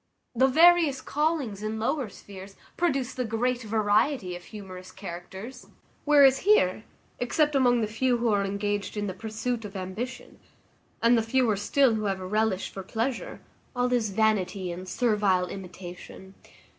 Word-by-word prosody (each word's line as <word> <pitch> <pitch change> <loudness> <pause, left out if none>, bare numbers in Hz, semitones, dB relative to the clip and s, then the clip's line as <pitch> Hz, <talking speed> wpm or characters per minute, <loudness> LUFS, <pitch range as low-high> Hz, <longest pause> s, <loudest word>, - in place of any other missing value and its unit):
The 260 +2 +4
various 320 -1 +5
callings 290 -8 -1
in 215 +1 -3
lower 255 +2 -1
spheres 195 0 -12 0.2
produce 275 -7 0
the 255 - -2
great 245 +2 -1
variety 215 -1 +1
of 175 - -10
humorous 185 -3 -10
characters; 190 +6 -9 0.4
whereas 280 -3 +6
here, 220 - +3 0.3
except 295 +5 +1
among 245 -3 +3
the 215 - 0
few 240 +3 +1
who 235 0 0
are 205 -2 +2
engaged 205 +1 -2
in 205 - -1
the 190 - -3
pursuit 225 +4 -4
of 205 -1 -9
ambition, 220 +7 -6 0.6
and 235 +1 +6
the 230 - +3
fewer 225 -1 +1
still 235 +5 +2
who 215 -1 -2
have 195 -1 -1
a 185 - -6
relish 210 0 0
for 195 - -7
pleasure, 230 +6 -3 0.3
all 250 0 +1
is 230 -4 +1
vanity 195 -3 0
and 185 +2 -7
servile 205 -5 +2
imitation. 185 0 -10
220 Hz, 155 wpm, -27 LUFS, 195-255 Hz, 0.6 s, whereas